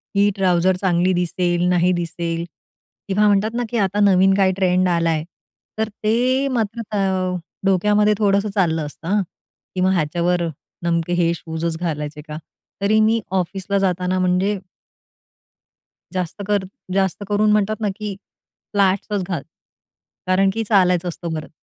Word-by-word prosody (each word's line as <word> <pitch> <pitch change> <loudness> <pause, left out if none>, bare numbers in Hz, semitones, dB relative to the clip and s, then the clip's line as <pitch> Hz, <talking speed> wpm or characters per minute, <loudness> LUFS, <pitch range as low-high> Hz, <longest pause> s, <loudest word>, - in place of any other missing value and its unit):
ही 200 +1 +4
trouser 185 -1 +2
चांगली 180 0 +2
दिसेल, 175 0 0
नाही 180 0 +3
दिसेल. 170 0 -3 0.6
किंवा 205 +2 +3
म्हणतात 205 +2 +2
ना, 245 - 0
की 235 - -2
आता 200 -1 +1
नवीन 195 -1 +5
काय 190 -1 +4
ट्रेंड 185 -1 +2
आला 170 -1 +2
आहे. 155 -1 0 0.5
तर 220 0 -1
ते 250 +5 +2
मात्र 225 +1 -2
त - - 0 0.7
डोक्यामध्ये 210 +2 +3
थोडंसं 200 0 +2
चाललं 160 -5 +1
असतं 150 +2 -10
हां, 205 +3 +2 0.5
की 185 - -1
ह्याच्यावर 175 0 +1 0.4
नेमके 170 0 0
हे 170 -1 +2
शूजच 160 0 -4
घालायचे 150 -3 -3
का? 150 0 -6 0.4
तरी 215 +2 +3
मी 225 +1 +3
ऑफिसला 190 +1 -1
जाताना 185 -1 0
म्हणजे 185 +3 +1 1.5
जास्त 185 +1 -3
कर 205 -2 +1 0.3
जास्त 190 0 0
करून 210 +1 +3
म्हणतात 210 +1 +1
ना, 210 - +1
की 210 -2 -5 0.6
फ्लॅट्सच 200 0 +1
घाल. 175 -6 -2 0.9
कारण 190 +1 +3
की 225 - -1
चालायचं 180 -4 +3
असतं 170 0 -5
परत. 155 - -10
185 Hz, 140 wpm, -21 LUFS, 175-205 Hz, 1.5 s, नवीन